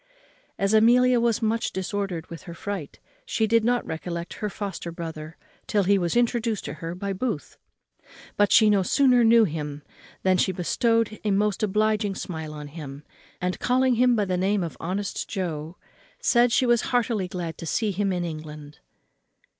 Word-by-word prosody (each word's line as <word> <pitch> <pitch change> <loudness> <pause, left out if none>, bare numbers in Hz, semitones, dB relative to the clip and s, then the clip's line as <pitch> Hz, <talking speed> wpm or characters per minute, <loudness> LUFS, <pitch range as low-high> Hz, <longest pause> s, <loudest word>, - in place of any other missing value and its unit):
As 195 +2 +1
Amelia 245 +3 +5
was 235 -1 +1
much 225 +1 0
disordered 190 -3 -3
with 165 - -9
her 170 - -7
fright, 190 -5 -6 0.2
she 220 - 0
did 230 +1 +3
not 245 +1 +1
recollect 170 +1 -5
her 210 - -1
foster 195 -4 -5
brother 160 -1 -7 0.3
till 205 -2 +2
he 200 +1 +3
was 175 +2 -1
introduced 235 -3 0
to 145 - -4
her 165 +1 -4
by 195 +2 -3
Booth; 245 +7 -3 0.8
but 205 0 +3
she 220 - +7
no 200 -2 +3
sooner 250 +4 +4
knew 230 0 +6
him 150 -5 -4 0.4
than 185 -1 +3
she 190 - +2
bestowed 225 +4 0
a 215 - 0
most 205 0 +1
obliging 215 -1 +1
smile 160 -5 -5
on 150 -1 -8
him; 145 -2 -9 0.4
and, 180 0 -2
calling 255 +1 +2
him 245 +1 +4
by 210 -2 +1
the 185 -1 -1
name 195 +1 +1
of 165 - -5
honest 195 +4 -3
Joe, 165 -4 -4 0.4
said 245 - +3
she 255 - +3
was 240 -1 +3
heartily 230 -6 0
glad 175 -3 -5
to 165 - -6
see 215 +5 0
him 200 +1 0
in 180 -1 -1
England. 150 -2 -8
200 Hz, 175 wpm, -25 LUFS, 170-230 Hz, 0.8 s, she